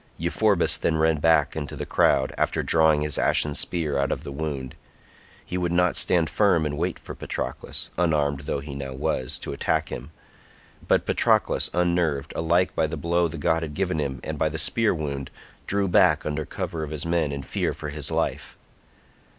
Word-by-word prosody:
Euphorbus 90 Hz, +3 st, +2 dB
then 80 Hz, -, +1 dB
ran 80 Hz, 0 st, +2 dB
back 80 Hz, -2 st, +3 dB
into 75 Hz, -3 st, -5 dB
the -, -, -5 dB
crowd, 65 Hz, -, +2 dB
after -, -, 0 dB
drawing 80 Hz, -2 st, +3 dB
his 75 Hz, -2 st, 0 dB
ashen 75 Hz, -, +3 dB
spear 75 Hz, -3 st, -1 dB
out 70 Hz, -, 0 dB
of -, -, -3 dB
the -, -, -7 dB
wound; 70 Hz, -3 st, -4 dB, 0.7 s
he 90 Hz, -, -3 dB
would 90 Hz, -1 st, -1 dB
not 90 Hz, 0 st, +2 dB
stand 85 Hz, -3 st, +2 dB
firm 90 Hz, -3 st, +2 dB
and 75 Hz, -1 st, -2 dB
wait -, -, -2 dB
for -, -, -9 dB
Patroclus, -, -, -5 dB
unarmed 75 Hz, -5 st, +1 dB
though 70 Hz, 0 st, -3 dB
he 70 Hz, 0 st, -8 dB
now 70 Hz, -1 st, -5 dB
was, 65 Hz, -1 st, -1 dB
to -, -, -5 dB
attack -, -, 0 dB
him; -, -, -7 dB, 0.8 s
but -, -, +3 dB
Patroclus -, -, +2 dB
unnerved, 85 Hz, -5 st, 0 dB
alike 85 Hz, +3 st, +1 dB
by 80 Hz, -, +2 dB
the 80 Hz, +1 st, -5 dB
blow 85 Hz, +3 st, +1 dB
the 80 Hz, 0 st, -7 dB
god 80 Hz, +2 st, +1 dB
had 75 Hz, -3 st, -5 dB
given 90 Hz, -2 st, -1 dB
him 70 Hz, -3 st, -2 dB
and -, -, -5 dB
by 80 Hz, -, +2 dB
the 80 Hz, -, -5 dB
spear 115 Hz, +7 st, +2 dB
wound, 70 Hz, -4 st, -4 dB, 0.4 s
drew 100 Hz, 0 st, +2 dB
back 90 Hz, -, +4 dB
under 75 Hz, 0 st, -2 dB
cover 80 Hz, +3 st, -4 dB
of 75 Hz, -, -4 dB
his 75 Hz, -1 st, -4 dB
men 85 Hz, -3 st, 0 dB
in 70 Hz, -1 st, -5 dB
fear -, -, -1 dB
for 75 Hz, -, -6 dB
his 75 Hz, 0 st, -1 dB
life. -, -, -2 dB
80 Hz, 190 wpm, -25 LUFS, 70-85 Hz, 0.8 s, back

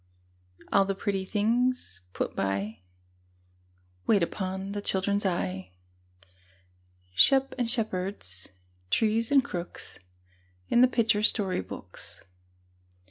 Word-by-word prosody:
All 200 Hz, -, +6 dB
the 195 Hz, 0 st, -2 dB
pretty 195 Hz, -1 st, -2 dB
things 225 Hz, -, 0 dB
put -, -, -3 dB
by, 100 Hz, +2 st, -2 dB, 1.3 s
Wait 200 Hz, -5 st, +4 dB
upon 190 Hz, +2 st, -4 dB
the 205 Hz, 0 st, -4 dB
children's 200 Hz, +1 st, +2 dB
eye, 95 Hz, -, -3 dB, 1.4 s
Sheep 270 Hz, -, +5 dB
and 240 Hz, -2 st, +1 dB
shepherds, 185 Hz, -, 0 dB, 0.4 s
trees 225 Hz, -, +2 dB
and 275 Hz, -2 st, +5 dB
crooks, 175 Hz, 0 st, -7 dB, 0.7 s
In 240 Hz, -, +4 dB
the 255 Hz, -, +7 dB
picture 225 Hz, -4 st, +2 dB
story 205 Hz, -, +2 dB
books. 95 Hz, -, -10 dB
200 Hz, 100 wpm, -28 LUFS, 175-225 Hz, 1.4 s, the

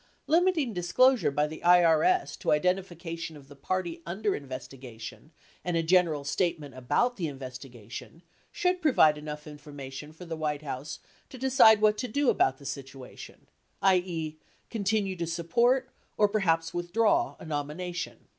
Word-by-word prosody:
Limiting 330 Hz, -6 st, +2 dB
disclosure 225 Hz, +9 st, +3 dB
by 145 Hz, +1 st, +1 dB
the 155 Hz, +1 st, -7 dB
IRS 175 Hz, -, +4 dB
to -, -, -11 dB
identifica 175 Hz, +1 st, 0 dB
tion 160 Hz, -2 st, -6 dB
of 140 Hz, -2 st, -15 dB
the 145 Hz, -, -14 dB
party 170 Hz, +3 st, -3 dB
under 195 Hz, +4 st, -1 dB
investigation 130 Hz, -1 st, -9 dB, 0.3 s
and 175 Hz, -1 st, -1 dB
a 165 Hz, -, +1 dB
general 165 Hz, -4 st, +3 dB
statement 150 Hz, -1 st, -1 dB
about 185 Hz, -, 0 dB
the 170 Hz, -4 st, -2 dB
investigation 130 Hz, -, -9 dB, 0.3 s
should 360 Hz, 0 st, 0 dB
provide 205 Hz, -, +5 dB
enough 150 Hz, 0 st, -7 dB
information 145 Hz, -1 st, -9 dB
for 160 Hz, +3 st, -12 dB
the 165 Hz, -1 st, -5 dB
White 155 Hz, -1 st, -2 dB
House 145 Hz, +1 st, -5 dB, 0.3 s
to 260 Hz, -, -10 dB
decide 255 Hz, -4 st, +6 dB
what 210 Hz, 0 st, +3 dB
to 250 Hz, -, -2 dB
do 275 Hz, +3 st, +2 dB
about 135 Hz, -, +2 dB
the 140 Hz, -, -15 dB
situation, 135 Hz, -1 st, -9 dB, 0.4 s
i.e., 175 Hz, -5 st, +1 dB, 0.3 s
continue 200 Hz, -3 st, 0 dB
to 170 Hz, -1 st, -3 dB
sup 170 Hz, 0 st, -5 dB
port, 250 Hz, +6 st, +3 dB, 0.3 s
or 210 Hz, -, +5 dB
perhaps 165 Hz, -6 st, +1 dB
withdraw 230 Hz, -, +1 dB
a -, -, -10 dB
nomination. 160 Hz, +3 st, -4 dB
170 Hz, 150 wpm, -28 LUFS, 145-205 Hz, 0.4 s, decide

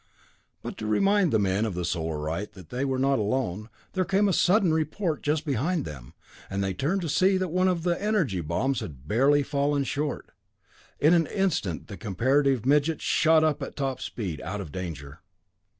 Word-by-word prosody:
But -, -, -6 dB
to 110 Hz, -, -4 dB
remind 195 Hz, -, +3 dB
the 110 Hz, -, +4 dB
men 100 Hz, 0 st, +1 dB
of 110 Hz, -5 st, -2 dB
the 90 Hz, -1 st, -2 dB
Solarite 80 Hz, +2 st, -3 dB
that 95 Hz, -4 st, -13 dB
they 125 Hz, +2 st, -2 dB
were 135 Hz, -1 st, 0 dB
not 135 Hz, +1 st, +2 dB
alone, 105 Hz, -2 st, -2 dB, 0.2 s
there 185 Hz, -, +1 dB
came 195 Hz, +3 st, +2 dB
a 195 Hz, -, +2 dB
sudden 180 Hz, -1 st, +3 dB
report 160 Hz, +1 st, -1 dB
just 150 Hz, +2 st, 0 dB
behind 150 Hz, +4 st, 0 dB
them, 65 Hz, -5 st, -9 dB, 0.3 s
and 100 Hz, 0 st, -2 dB
they 95 Hz, -1 st, -1 dB
turned 155 Hz, -, -1 dB
to 170 Hz, -, -3 dB
see 190 Hz, +5 st, +3 dB
that 185 Hz, -1 st, -1 dB
one 185 Hz, +3 st, +2 dB
of 175 Hz, -3 st, 0 dB
the 175 Hz, 0 st, 0 dB
energy 185 Hz, -, 0 dB
bombs 110 Hz, -, -1 dB
had 70 Hz, -4 st, -9 dB
barely 140 Hz, -, +3 dB
fallen 140 Hz, 0 st, 0 dB
short! 145 Hz, +1 st, -3 dB, 0.7 s
In 155 Hz, +4 st, +5 dB
an 165 Hz, -3 st, +3 dB
instant 170 Hz, -, -1 dB
the 100 Hz, -4 st, -9 dB
comparative 130 Hz, -, +1 dB
midget 150 Hz, +3 st, +2 dB
shot 160 Hz, -2 st, +3 dB
up 155 Hz, -2 st, +1 dB
at -, -, -6 dB
top 135 Hz, -3 st, -2 dB
speed, 90 Hz, -10 st, -5 dB
out 95 Hz, +6 st, -4 dB
of 95 Hz, -7 st, -7 dB
danger. 80 Hz, -4 st, -7 dB
135 Hz, 190 wpm, -26 LUFS, 95-160 Hz, 0.7 s, In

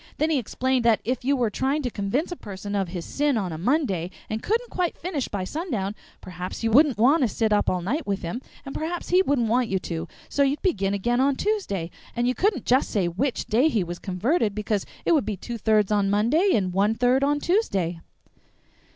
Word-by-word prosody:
Then 310 Hz, +1 st, +1 dB
he 295 Hz, -, +3 dB
explained 255 Hz, +2 st, 0 dB
that 230 Hz, -2 st, +4 dB
if 250 Hz, +2 st, -1 dB
you 280 Hz, +3 st, +2 dB
were 240 Hz, -5 st, 0 dB
trying 275 Hz, +7 st, 0 dB
to 245 Hz, -, -2 dB
convince 220 Hz, -, -1 dB
a -, -, -3 dB
person 200 Hz, -, -7 dB
of 195 Hz, -2 st, 0 dB
his 170 Hz, -1 st, -6 dB
sin 290 Hz, -3 st, 0 dB
on 190 Hz, -5 st, -2 dB
a 160 Hz, -, -5 dB
Monday, 195 Hz, -, 0 dB, 0.2 s
and 220 Hz, +1 st, -2 dB
couldn't 470 Hz, +3 st, -1 dB
quite 360 Hz, -2 st, -1 dB
finish 330 Hz, -7 st, -3 dB
by 200 Hz, -3 st, -3 dB
sundown, 225 Hz, -, -3 dB, 0.3 s
perhaps 180 Hz, +3 st, -7 dB
you 225 Hz, -, +1 dB
wouldn't 280 Hz, +1 st, +5 dB
want 270 Hz, +9 st, +4 dB
to 255 Hz, -, +4 dB
sit 220 Hz, 0 st, 0 dB
up 205 Hz, -, +2 dB
all 180 Hz, -, 0 dB
night 275 Hz, -, -2 dB
with 200 Hz, -1 st, -2 dB
him, 175 Hz, +9 st, -4 dB, 0.2 s
and 275 Hz, -, -6 dB
perhaps 335 Hz, +2 st, -4 dB
he 365 Hz, +1 st, +5 dB
wouldn't 275 Hz, -10 st, +1 dB
want 240 Hz, +1 st, +1 dB
you 190 Hz, -, +1 dB
to; 165 Hz, -2 st, -4 dB, 0.2 s
so 285 Hz, -, -1 dB
you'd 280 Hz, +1 st, +1 dB
begin 200 Hz, -, +1 dB
again 240 Hz, +5 st, +1 dB
on 275 Hz, 0 st, +3 dB
Tuesday, 230 Hz, -, -2 dB, 0.2 s
and 240 Hz, 0 st, +1 dB
you 250 Hz, -, +2 dB
couldn't 380 Hz, -, 0 dB
say 225 Hz, -7 st, +2 dB
just 170 Hz, -, -12 dB
which 270 Hz, -1 st, 0 dB
day 245 Hz, +7 st, +3 dB
he 220 Hz, -10 st, +1 dB
was 175 Hz, 0 st, -6 dB
converted, 210 Hz, -, 0 dB
because 210 Hz, -1 st, -1 dB, 0.2 s
it -, -, +2 dB
would 315 Hz, -4 st, +4 dB
be 205 Hz, -1 st, -3 dB
two 235 Hz, +5 st, -6 dB
thirds 215 Hz, -2 st, +2 dB
on 205 Hz, -2 st, +2 dB
Monday 235 Hz, -, +3 dB
and 185 Hz, -4 st, 0 dB
one 205 Hz, +4 st, +2 dB
third 250 Hz, +3 st, +3 dB
on 290 Hz, +1 st, +2 dB
Tuesday." 195 Hz, -, 0 dB
235 Hz, 225 wpm, -25 LUFS, 200-285 Hz, 0.3 s, wouldn't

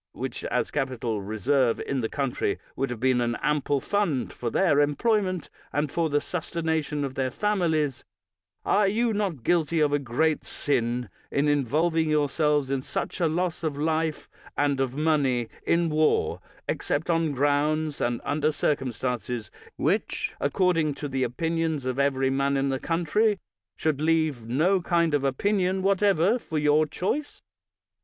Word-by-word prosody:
which -, -, -5 dB
as -, -, -1 dB
capital 125 Hz, -6 st, -2 dB
reserved 115 Hz, +5 st, +1 dB
in 135 Hz, -2 st, -2 dB
the 110 Hz, -, -2 dB
coun 140 Hz, -3 st, -1 dB
try -, -, -1 dB, 0.2 s
would 135 Hz, +1 st, -1 dB
have 120 Hz, -2 st, -5 dB
been 130 Hz, 0 st, +2 dB
an 120 Hz, 0 st, 0 dB
ample 145 Hz, -1 st, +1 dB
fund 175 Hz, -5 st, -1 dB
for 120 Hz, -, -3 dB
their 155 Hz, 0 st, +3 dB
employment 185 Hz, +4 st, +1 dB, 0.2 s
and 145 Hz, -1 st, -1 dB
for 165 Hz, -2 st, 0 dB
the 145 Hz, 0 st, +2 dB
sustentation 160 Hz, -3 st, -2 dB
of 135 Hz, -, -5 dB
their 130 Hz, -1 st, -1 dB
families, 160 Hz, -6 st, 0 dB, 0.6 s
are 205 Hz, -1 st, +3 dB
you 225 Hz, +3 st, +1 dB
not 195 Hz, -, -2 dB
guilty 165 Hz, 0 st, +2 dB
of 150 Hz, -1 st, +3 dB
a 145 Hz, -, +3 dB
great 145 Hz, +4 st, 0 dB
sin 120 Hz, -3 st, -1 dB, 0.2 s
in 140 Hz, +2 st, +1 dB
involving 155 Hz, +4 st, +1 dB
yourselves 150 Hz, -1 st, +1 dB
in 135 Hz, -1 st, 0 dB
such -, -, -4 dB
a 170 Hz, -, +3 dB
loss 175 Hz, +2 st, -1 dB
of 150 Hz, -3 st, -2 dB
life 160 Hz, +1 st, -1 dB, 0.3 s
and 145 Hz, -2 st, +1 dB
of 130 Hz, -1 st, -1 dB
money 140 Hz, -6 st, +1 dB, 0.2 s
in 170 Hz, 0 st, +3 dB
war, 155 Hz, 0 st, +1 dB, 0.3 s
except 150 Hz, +3 st, -1 dB
on 165 Hz, -2 st, +1 dB
grounds 145 Hz, +2 st, +1 dB
and 120 Hz, -1 st, 0 dB
under 150 Hz, +1 st, +1 dB
circumstances 125 Hz, -5 st, -2 dB, 0.2 s
which, -, -, -1 dB
according 165 Hz, -1 st, +1 dB
to 145 Hz, -, -5 dB
the 135 Hz, -1 st, -2 dB
opinions 160 Hz, +3 st, -1 dB
of 130 Hz, +1 st, -2 dB
every 135 Hz, -1 st, +2 dB
man 140 Hz, +1 st, +1 dB
in 135 Hz, 0 st, +1 dB
the 135 Hz, -1 st, -1 dB
country, 175 Hz, +7 st, +1 dB, 0.4 s
should 155 Hz, -2 st, 0 dB
leave 155 Hz, -7 st, +1 dB
no 170 Hz, +10 st, +2 dB
kind 170 Hz, -2 st, +1 dB
of 145 Hz, -2 st, +2 dB
option 185 Hz, +7 st, +1 dB
whatever 200 Hz, +2 st, +3 dB
for 160 Hz, -, -5 dB
your 150 Hz, +1 st, +3 dB
choice? 220 Hz, -, -3 dB
150 Hz, 155 wpm, -26 LUFS, 135-165 Hz, 0.6 s, their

